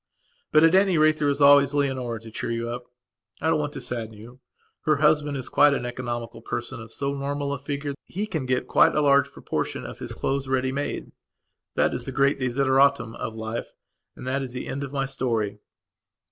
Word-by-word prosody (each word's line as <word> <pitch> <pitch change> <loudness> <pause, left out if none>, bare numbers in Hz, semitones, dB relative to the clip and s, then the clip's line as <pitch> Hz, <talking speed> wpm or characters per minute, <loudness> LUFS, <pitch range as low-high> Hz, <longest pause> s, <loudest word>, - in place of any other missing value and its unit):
But, 155 +1 +6
at 165 +1 +6
any 190 -2 +4
rate, 155 0 +4
there 145 -2 +1
is 140 0 +1
always 140 0 +6
Leonora 130 -5 -1
to 115 0 -11
cheer 110 - -4
you 115 0 -2
up; 120 0 -6 0.5
I 160 +2 +1
don't 155 - +2
want 145 -1 -2
to - - -6
sadden 115 -3 -5
you. 120 +4 -13 0.5
Her 155 - +4
husband 150 -1 +2
is 130 - -5
quite 145 -1 +5
an 120 - -3
economical 120 -2 -5
person 120 +1 -4
of 110 -1 -11
so 140 +3 -2
normal 140 0 -2
a 140 - -4
figure 145 +1 -3
that 140 - -10
he 200 +4 -3
can 160 -11 -3
get 130 -1 0
quite - - +4
a 150 - +3
large 140 -1 +4
proportion - - -3
of - - -8
his - - -6
clothes 135 0 -1
ready 130 0 +1
made. 140 +2 -3 0.6
That - - +2
is - - -4
the - - -4
great 140 0 +2
desideratum 130 -1 +2
of 110 - -5
life, 110 +1 -5 0.4
and - - -10
that 135 +2 0
is 130 -2 -5
the 125 - -5
end 140 +1 -3
of 135 - -6
my 135 -1 -1
story. 115 -7 -2
135 Hz, 215 wpm, -25 LUFS, 120-145 Hz, 0.6 s, But